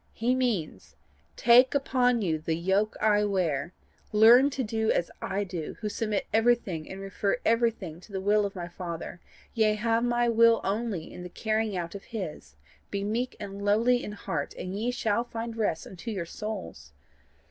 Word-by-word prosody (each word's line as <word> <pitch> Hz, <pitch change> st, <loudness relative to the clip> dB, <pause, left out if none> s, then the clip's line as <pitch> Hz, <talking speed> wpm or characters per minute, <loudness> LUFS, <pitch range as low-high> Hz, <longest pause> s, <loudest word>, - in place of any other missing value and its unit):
He 240 Hz, +3 st, +1 dB
means 240 Hz, -11 st, -2 dB, 0.4 s
TAKE 250 Hz, +3 st, +6 dB
UPON 250 Hz, -4 st, +2 dB
YOU 160 Hz, -4 st, 0 dB
THE 160 Hz, +1 st, -1 dB
YOKE 190 Hz, +5 st, +1 dB
I 210 Hz, -1 st, +3 dB
WEAR; 170 Hz, -7 st, 0 dB, 0.4 s
LEARN 235 Hz, +6 st, +7 dB
TO 270 Hz, -2 st, -3 dB
DO 220 Hz, 0 st, 0 dB
AS 175 Hz, -, 0 dB
I 200 Hz, +1 st, -1 dB
DO, 175 Hz, -5 st, -5 dB
WHO 215 Hz, -, -3 dB
SUBMIT 215 Hz, -1 st, -2 dB
EVERYTHING 225 Hz, -8 st, +1 dB
AND 190 Hz, -, -7 dB
REFER 195 Hz, +3 st, -1 dB
EVERYTHING 230 Hz, -8 st, +1 dB
TO 195 Hz, -, -16 dB
THE 190 Hz, -, -3 dB
WILL 205 Hz, +1 st, +2 dB
OF 200 Hz, -, -12 dB
MY 175 Hz, -2 st, -5 dB
FATHER, 175 Hz, -1 st, -6 dB, 0.3 s
YEA 215 Hz, -2 st, +3 dB
HAVE 230 Hz, +2 st, +1 dB
MY 240 Hz, 0 st, +2 dB
WILL 230 Hz, 0 st, +5 dB
ONLY 200 Hz, -4 st, -2 dB
IN -, -, -8 dB
THE 180 Hz, -, -7 dB
CARRYING 215 Hz, 0 st, -1 dB
OUT 170 Hz, -1 st, -4 dB
OF 200 Hz, -, -9 dB
HIS: 165 Hz, -, -7 dB, 0.3 s
BE 200 Hz, 0 st, -3 dB
MEEK 230 Hz, +5 st, -2 dB
AND 200 Hz, -1 st, -7 dB
LOWLY 230 Hz, +5 st, +3 dB
IN 210 Hz, -, -5 dB
HEART, 165 Hz, -7 st, -4 dB
AND 185 Hz, +1 st, -5 dB
YE 225 Hz, +4 st, -1 dB
SHALL 235 Hz, -2 st, 0 dB
FIND 230 Hz, -1 st, -5 dB
REST 205 Hz, -8 st, -1 dB
UNTO 190 Hz, +5 st, -8 dB
YOUR 190 Hz, -6 st, -3 dB
SOULS. 180 Hz, -, -7 dB
210 Hz, 180 wpm, -28 LUFS, 185-230 Hz, 0.4 s, LEARN